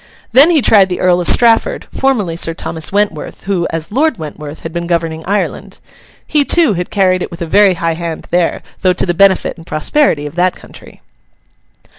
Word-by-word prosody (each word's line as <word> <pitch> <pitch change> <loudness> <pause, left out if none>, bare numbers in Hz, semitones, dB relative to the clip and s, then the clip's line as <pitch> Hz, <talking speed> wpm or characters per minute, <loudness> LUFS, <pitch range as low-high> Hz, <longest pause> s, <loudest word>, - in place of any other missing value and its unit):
Then 275 +7 +6
he 315 -7 +2
tried 195 -3 +5
the 180 - -3
Earl 180 -1 +2
of 175 - -4
Strafford, 230 -2 +2
formerly 220 -11 0
Sir 165 -1 0
Thomas 160 -1 -4
Wentworth; 205 +1 -2
who, 190 -3 -1
as 165 +1 -4
Lord 290 +2 +1
Wentworth, 150 -1 -8
had 165 - -7
been 170 0 -4
governing 165 -2 -2
Ireland. 205 +2 -3 0.5
He, 300 -1 +1
too, 320 -5 +2
had 180 -1 -4
carried 185 -3 +1
it - - -4
with 170 0 -7
a - - -3
very 195 +3 +3
high 165 0 -1
hand 165 -1 -5
there, 175 -1 0 0.2
though 185 -1 +3
to - - -1
the 175 - 0
benefit 195 +1 +2
and 165 0 -14
prosperity 155 - 0
of 145 - -7
that 180 +1 +1
country. - - -15
180 Hz, 195 wpm, -14 LUFS, 165-205 Hz, 0.5 s, Then